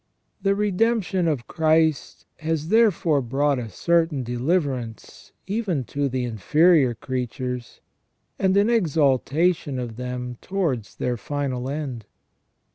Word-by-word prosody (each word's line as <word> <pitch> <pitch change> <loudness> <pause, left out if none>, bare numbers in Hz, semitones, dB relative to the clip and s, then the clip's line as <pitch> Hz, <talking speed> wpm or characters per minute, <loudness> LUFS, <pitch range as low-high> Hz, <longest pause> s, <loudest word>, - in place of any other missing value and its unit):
The 195 0 +2
redemption 205 -2 +1
of 140 -7 -1
Christ 160 -2 +1
has 160 -1 -2
therefore 180 -9 +3
brought 135 +3 0
a 115 -2 -5
certain 165 - +1
de 120 0 -4
liverance 130 -5 -2
even 195 - -1
to 140 +3 -2
the 130 0 -2
inferior 130 - +3
creatures, 125 0 -5 0.6
and 190 0 +2
an 200 +1 +4
exaltation 155 - +1
of 120 -3 -5
them 125 -1 -5
towards 160 - -2
their 125 -1 -2
final 130 0 -3
end. 135 -7 -5
145 Hz, 120 wpm, -24 LUFS, 125-175 Hz, 0.6 s, an